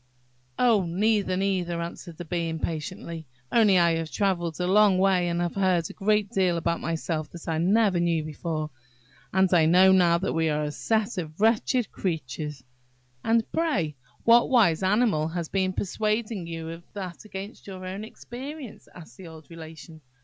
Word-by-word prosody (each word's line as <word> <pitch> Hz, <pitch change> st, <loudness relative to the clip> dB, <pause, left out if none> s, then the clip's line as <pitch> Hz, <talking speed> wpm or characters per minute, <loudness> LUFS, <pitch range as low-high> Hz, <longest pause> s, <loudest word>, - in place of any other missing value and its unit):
"Oh, 230 Hz, -6 st, +4 dB
neither, 195 Hz, +1 st, +1 dB
neither!" 185 Hz, -3 st, -1 dB
answered 170 Hz, 0 st, -7 dB
the 175 Hz, -, -7 dB
Bee, 170 Hz, 0 st, -2 dB
impatiently; 160 Hz, 0 st, -5 dB, 0.2 s
"only 210 Hz, -5 st, +5 dB
I 170 Hz, -2 st, +3 dB
have 165 Hz, -1 st, -4 dB
travelled 175 Hz, -5 st, -1 dB
a 180 Hz, -, 0 dB
long 200 Hz, 0 st, +5 dB
way, 185 Hz, -2 st, +3 dB
and 170 Hz, 0 st, -1 dB
have 175 Hz, -1 st, -1 dB
heard 185 Hz, -4 st, +1 dB
a -, -, -13 dB
great 210 Hz, 0 st, +1 dB
deal 185 Hz, -3 st, +2 dB
about 170 Hz, 0 st, -1 dB
myself 160 Hz, -1 st, -3 dB
that 170 Hz, -, -11 dB
I 160 Hz, -1 st, 0 dB
never 195 Hz, +1 st, +3 dB
knew 170 Hz, -2 st, +1 dB
before, 155 Hz, 0 st, -4 dB, 0.6 s
and 190 Hz, 0 st, +3 dB
I 165 Hz, -3 st, +5 dB
know 185 Hz, +3 st, +6 dB
now 175 Hz, -3 st, +5 dB
that 190 Hz, +3 st, -2 dB
we 160 Hz, -1 st, +1 dB
are 150 Hz, 0 st, 0 dB
a 150 Hz, -, -2 dB
set 220 Hz, +4 st, -1 dB
of 155 Hz, 0 st, -7 dB
wretched 225 Hz, +2 st, +2 dB
creatures!" 150 Hz, -5 st, -4 dB, 0.6 s
"And, 225 Hz, 0 st, +3 dB
pray, 200 Hz, -, 0 dB, 0.3 s
what 235 Hz, +1 st, +5 dB
wise 210 Hz, -11 st, +4 dB
animal 190 Hz, -5 st, +2 dB
has 165 Hz, 0 st, -4 dB
been 190 Hz, -1 st, 0 dB
persuading 210 Hz, 0 st, -2 dB
you 165 Hz, -1 st, -6 dB
of 165 Hz, +1 st, -7 dB
that, 185 Hz, -4 st, -7 dB
against 205 Hz, 0 st, -9 dB
your 185 Hz, -1 st, -8 dB
own 190 Hz, +3 st, -5 dB
experience?" 255 Hz, +4 st, -9 dB
asked 170 Hz, -3 st, -13 dB
the 185 Hz, -, -10 dB
old 160 Hz, 0 st, -13 dB
Relation. 160 Hz, -1 st, -11 dB
180 Hz, 170 wpm, -26 LUFS, 165-205 Hz, 0.6 s, know